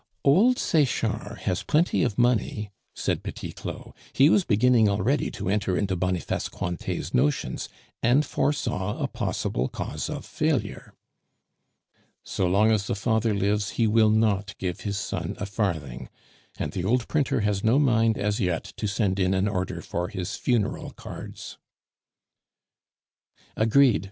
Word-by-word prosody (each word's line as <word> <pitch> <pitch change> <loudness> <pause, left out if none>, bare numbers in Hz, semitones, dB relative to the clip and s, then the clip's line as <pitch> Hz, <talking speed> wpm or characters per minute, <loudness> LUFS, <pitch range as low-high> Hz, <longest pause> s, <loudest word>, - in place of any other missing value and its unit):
"Old 205 - +5
Sechard 150 -6 0
has 90 - -1
plenty 160 +3 +2
of 115 -6 0
money," 115 -4 +1 0.2
said - - -1
Petit - - -6
Claud. - - -8 0.2
He 140 +4 +5
was 200 - +4
beginning 115 -2 +4
already 105 +9 +1
to - - -6
enter 95 -2 +1
into 95 -1 0
Boniface 90 0 -1
Cointet's 85 0 -4
notions, 70 +4 0 0.3
and 130 +6 +3
foresaw 105 -9 -1
a - - -1
possible 60 +2 -2
cause - - -4
of - - -5
failure. - - -2 1.3
"So 95 - -1
long 105 +5 +4
as 100 -2 +1
the - - -1
father 110 +1 +1
lives, 100 +1 0
he 115 - +3
will 110 0 +4
not 105 -2 +1
give 90 0 -3
his 100 -1 -3
son 110 - -3
a 105 - -3
farthing; 85 - -3 0.5
and - - -3
the 95 -3 -3
old 120 +5 +1
printer 140 -5 +1
has 105 -2 0
no 115 +4 +4
mind 115 -6 +3
as 105 +2 -1
yet 90 -5 0
to 105 - -2
send 100 -1 0
in 95 0 +2
an 95 +2 +1
order 95 -3 -2
for 90 +1 -3
his 95 -3 -4
funeral 120 -5 -1
cards." - - -9 2.0
"Agreed!" 115 +2 +4
105 Hz, 145 wpm, -26 LUFS, 95-120 Hz, 2.0 s, Old